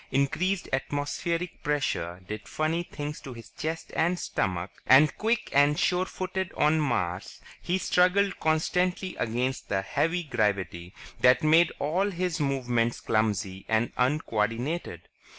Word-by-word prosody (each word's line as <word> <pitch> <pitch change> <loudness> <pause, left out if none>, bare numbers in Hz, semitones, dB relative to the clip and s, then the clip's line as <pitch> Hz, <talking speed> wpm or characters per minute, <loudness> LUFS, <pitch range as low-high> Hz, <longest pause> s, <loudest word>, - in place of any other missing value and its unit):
Increased 175 +8 0
atmospheric 145 +5 -2
pressure 130 - -1
did 105 +2 -6
funny 155 +2 -1
things 150 -3 -6
to 135 - -8
his 115 -2 -12
chest 160 +1 -5
and 170 +3 +2
stomach. 90 - -2 0.2
And 140 +3 +6
quick 225 +2 -1
and 145 +1 +4
sure 180 0 +2
footed 190 -1 -4
on 155 +1 +3
Mars, 90 - -2 0.2
he 180 - 0
struggled 190 +2 +2
constantly 180 +4 0
against 125 +3 -2
the 95 -1 0
heavy 165 - 0
gravity 100 - -2 0.2
that 125 +2 +5
made 160 +3 +5
all 180 +8 0
his 180 -2 -2
movements 125 -5 0
clumsy 100 -3 -1
and 110 +1 +1
uncoordinated. 125 +2 -1
145 Hz, 130 wpm, -27 LUFS, 115-175 Hz, 0.2 s, And